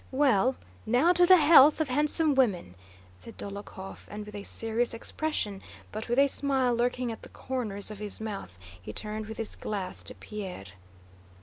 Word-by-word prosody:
"Well, 260 -3 +3 0.3
now 255 +10 +3
to 355 0 +5
the 370 0 +9
health 300 -2 +7
of 315 -3 0
handsome 300 +3 +2
women!" 205 - +1 0.5
said 90 - -12
Dólokhov, 200 -1 -8
and 210 0 -7
with 210 - -11
a 205 - -6
serious 225 +3 -1
expression, 225 -6 -3 0.3
but 215 +2 -6
with 240 - +1
a 280 - +7
smile 265 -3 0
lurking 245 +1 0
at 225 - -8
the - - -12
corners 215 -6 -3
of 210 - -8
his 210 -1 -4
mouth, 200 - -6 0.2
he 100 - -7
turned 215 - -3
with 220 - -7
his 225 -2 -4
glass 195 -3 -4
to - - -7
Pierre. 195 - -7
225 Hz, 175 wpm, -28 LUFS, 205-270 Hz, 0.5 s, the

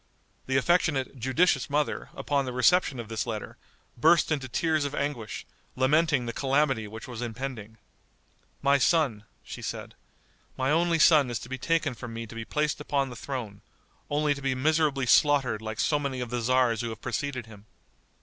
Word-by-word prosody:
The 130 0 +2
affectionate, 140 -3 +1
judicious 135 +4 +2
mother, 145 +1 -1
upon 140 -2 0
the 130 - -4
reception 135 +1 +3
of 115 - -6
this 110 0 -3
letter, 110 -2 -5 0.4
burst 160 +7 +4
into 140 -4 -1
tears 155 +4 +1
of 145 0 -3
anguish, 125 -7 -3 0.3
lamenting 145 0 +2
the 115 - -4
calamity 135 -5 +1
which 110 +2 -9
was 120 -2 -7
impending. 115 -2 -6 0.9
"My 140 0 +4
son," 130 -9 +2 0.2
she - - -8
said, - - -6 0.6
"my 130 +2 +1
only 170 +1 +2
son 155 -4 +5
is 120 - -2
to 120 - -9
be 130 0 -5
taken 155 0 0
from 120 -1 -8
me 115 0 -5
to 115 - -11
be 115 0 -6
placed 150 +2 -1
upon 140 -2 -1
the - - -8
throne, 115 -6 -6 0.5
only 150 0 +2
to 140 - -9
be 135 -1 0
miserably 150 -1 +1
slaughtered 130 -4 +3
like 110 -1 -6
so 150 - +2
many 140 -3 -3
of 125 -2 -4
the 120 - -1
tzars 120 -1 +2
who 120 - -3
have 110 -1 -8
preceded 140 -5 -3
him." 105 -2 -15
130 Hz, 180 wpm, -27 LUFS, 115-150 Hz, 0.9 s, son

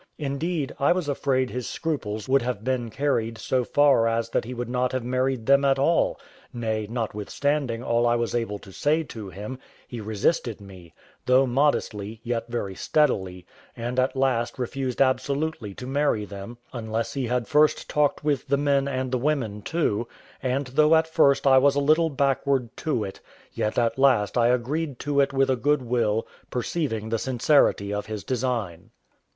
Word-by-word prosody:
Indeed, 150 +1 -2
I 140 - +4
was 180 -4 -2
afraid 130 -2 0
his 125 -1 -4
scruples 110 -10 -3
would 135 +1 +3
have 120 -3 -3
been 125 -2 -1
carried 115 -4 -1
so 130 +2 0
far 140 -3 +4
as 115 0 0
that - - 0
he 125 - -6
would 120 0 -4
not 125 +1 -1
have 130 -2 -1
married 130 -1 -1
them 140 +2 +5
at 135 -1 +3
all; 165 +5 +2 0.3
nay, 110 -3 -2
notwithstanding 120 +3 -2
all 120 0 +2
I 120 - +3
was 120 -1 -1
able 115 -4 -1
to 100 - -14
say 155 - +1
to 110 -8 -8
him, 105 +8 -7 0.3
he 120 -2 -7
resisted 110 +3 -1
me, 95 -5 -13 0.3
though 130 +1 +5
modestly, 115 -5 0
yet 115 -1 -2
very 115 -5 -3
steadily, 95 - 0 0.3
and 120 +2 -2
at 130 +1 +1
last 125 -3 0
refused 130 +1 0
absolutely 130 -4 -1
to 125 - -8
marry 135 -5 0
them, 100 +4 -9 0.2
unless 115 -1 -3
he 135 -3 -2
had 125 -2 -1
first 150 +3 +3
talked 150 -1 +1
with 145 -2 0
the 140 +1 +2
men 140 -1 +2
and 130 -2 -2
the 130 - 0
women 120 -7 -1
too; 120 -6 -1 0.3
and 130 +2 -1
though 150 +5 +4
at 160 0 +4
first 140 -4 +3
I 135 -1 +7
was 140 +1 +3
a - - +2
little 155 +3 +3
backward 135 -3 0
to 135 -8 -1
it, 95 -1 -7 0.3
yet 105 - -2
at 120 +2 +1
last 130 -7 +3
I 120 -1 +4
agreed 130 +4 -1
to 145 -1 0
it 140 - +3
with 135 -1 +2
a - - +3
good 145 +3 +1
will, 115 -3 0 0.2
perceiving 120 -4 -2
the 115 0 0
sincerity 125 -5 +2
of 105 +1 -3
his 110 -2 -5
design. 115 -7 -3
125 Hz, 180 wpm, -25 LUFS, 115-140 Hz, 0.3 s, I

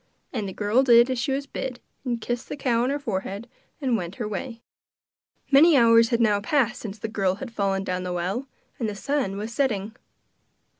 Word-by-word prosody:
And 215 -6 -2
the - - -6
girl 210 +6 +2
did 240 -1 +6
as 255 - -1
she 245 +3 -1
was 275 +1 -1
bid, 260 -2 -5 0.2
and 240 -3 -2
kissed 240 +2 -4
the - - -5
cow 240 -4 +1
on 250 - +1
her 285 - 0
forehead 205 -3 -4 0.3
and 260 -5 +1
went 180 -3 -4
her 225 - -4
way. 230 +3 -6 0.9
Many 295 +3 +7
hours 230 -1 +6
had 235 - +1
now 210 -3 +3
passed 240 0 +1
since 210 -2 -6
the 220 - -4
girl 195 -4 0
had 240 +4 -8
fallen 195 -2 0
down 185 -1 -2
the 180 0 -4
well, 185 +9 -2 0.3
and 225 -3 -1
the 205 - -5
sun 255 -4 -1
was 215 +3 -5
setting. 220 -6 -1
230 Hz, 205 wpm, -25 LUFS, 200-260 Hz, 0.9 s, Many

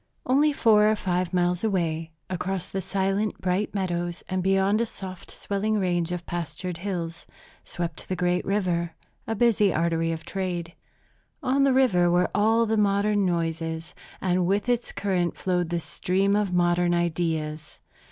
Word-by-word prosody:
Only 285 +4 +4
four 215 -6 +4
or 215 - +3
five 180 -3 -1
miles 180 0 +1
away, 165 -6 0 0.2
across 185 0 -3
the 195 - -3
silent, 195 +3 -1
bright 185 +3 -1
meadows 175 -3 -2
and 185 0 -1
beyond 195 +3 +2
a - - +2
softly 185 -4 -8
swelling 210 +2 -1
range 175 -3 0
of 175 -1 -4
pastured 175 +1 -4
hills, 175 -3 -4 0.4
swept 170 -2 -5
the 185 - 0
great 180 0 +1
river, 175 -4 -1 0.3
a 225 - -1
busy 215 -3 +3
artery 165 0 +1
of 165 0 -5
trade. 175 -3 -3 0.7
On 275 +1 +3
the 275 - +4
river 195 -10 +4
were 175 +1 +2
all 225 +3 +3
the 220 0 0
modern 205 -1 +2
noises, 165 -1 -2 0.3
and 180 -1 +1
with 200 +4 +1
its 245 -1 0
current 180 -4 -1
flowed 180 -2 0
the 170 0 0
stream 190 +5 0
of 205 -2 +1
modern 175 0 +2
ideas. 160 -3 -2
180 Hz, 155 wpm, -26 LUFS, 175-205 Hz, 0.7 s, Only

